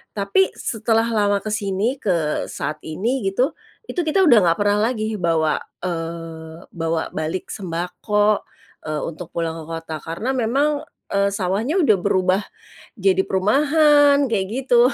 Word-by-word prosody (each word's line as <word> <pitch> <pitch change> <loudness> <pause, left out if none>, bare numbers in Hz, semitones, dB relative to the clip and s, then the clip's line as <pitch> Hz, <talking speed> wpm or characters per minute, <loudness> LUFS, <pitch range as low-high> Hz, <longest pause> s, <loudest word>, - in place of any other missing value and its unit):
Tapi 205 - +2
setelah 225 0 0
lama 205 -2 +1
ke 215 - -4
sini, 210 +5 -1
ke 165 -6 0
saat 150 0 -4
ini 225 +12 -1
gitu, 250 +10 +1 0.4
itu 360 - -4
kita 380 +5 +3
udah 245 -10 +7
nggak 165 - +4
pernah 205 0 +2
lagi 215 -3 -3
bawa, 165 -3 +1 0.2
eee, 165 -1 -5
bawa 165 -1 -2
balik 160 +4 -4
sembako, 205 +3 -1 0.4
eee, 155 -1 -2
untuk 165 +1 -6
pulang 165 -1 -2
ke - - -8
kota 165 -1 -5
karena 170 - -3
memang, 285 +5 0 0.2
eee, 200 0 +2
sawahnya 205 - -1
udah 215 -8 +4
berubah 185 +2 +1 0.6
jadi 190 -1 +3
perumahan 285 +8 +4
kayak 210 -6 0 0.2
gitu. 240 -2 +5
200 Hz, 140 wpm, -21 LUFS, 165-235 Hz, 0.6 s, udah